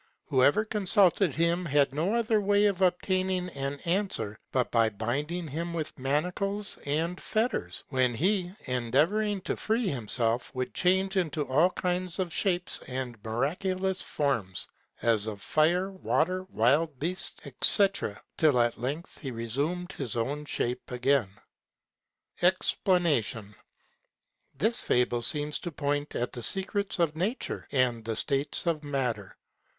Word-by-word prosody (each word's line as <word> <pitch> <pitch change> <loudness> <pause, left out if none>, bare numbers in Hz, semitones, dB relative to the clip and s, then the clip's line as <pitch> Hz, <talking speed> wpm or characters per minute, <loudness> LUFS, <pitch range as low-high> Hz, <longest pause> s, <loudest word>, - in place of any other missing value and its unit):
Whoever 145 +9 +4
consulted 195 -5 +3
him, 170 +2 +1
had 145 -3 +2
no 170 +10 0
other 225 -2 +2
way 205 +1 +3
of 195 -2 +1
obtaining 185 0 +1
an 140 -2 -4
answer, 170 - -1
but 125 -2 0
by 115 -2 +4
binding 145 - -3
him 170 +4 -4
with 155 -3 -4
manacles 180 +9 -1
and 165 +5 -1
fetters; 225 +3 -1
when 130 -3 +1
he, 180 - +1
endeavoring 155 - +1
to - - -2
free 220 0 0
himself, 120 - -1
would 130 0 -3
change 190 +2 +2
into 155 -5 0
all 155 +7 +4
kinds 180 -1 -2
of 180 -4 -2
shapes 180 -1 0
and 125 -4 -5
miraculous 185 - -1
forms; 115 -11 -1 0.4
as 110 -2 +2
of 105 -2 -4
fire, 175 - +2
water, 185 -1 0
wild 145 - +2
beasts, 175 +7 -2 0.2
&c. 200 -2 +7 0.5
till 150 -6 +4
at 120 -1 +1
length 145 +9 -4
he 140 - -5
resumed 140 - -2
his 130 -9 -4
own 140 +6 -2
shape 125 -3 -2
again. 125 -3 +2 1.1
EXPLANATION.—This 175 - -1
fable 120 -1 +1
seems 150 +4 -1
to 175 - -5
point 145 -1 -2
at 120 - -2
the 120 - -6
secrets 195 - 0
of 165 -3 +1
nature, 200 +10 -2
and 125 -4 +1
the 115 0 -3
states 140 +7 0
of 160 -3 0
matter. 125 -8 -2
155 Hz, 135 wpm, -29 LUFS, 125-185 Hz, 1.1 s, c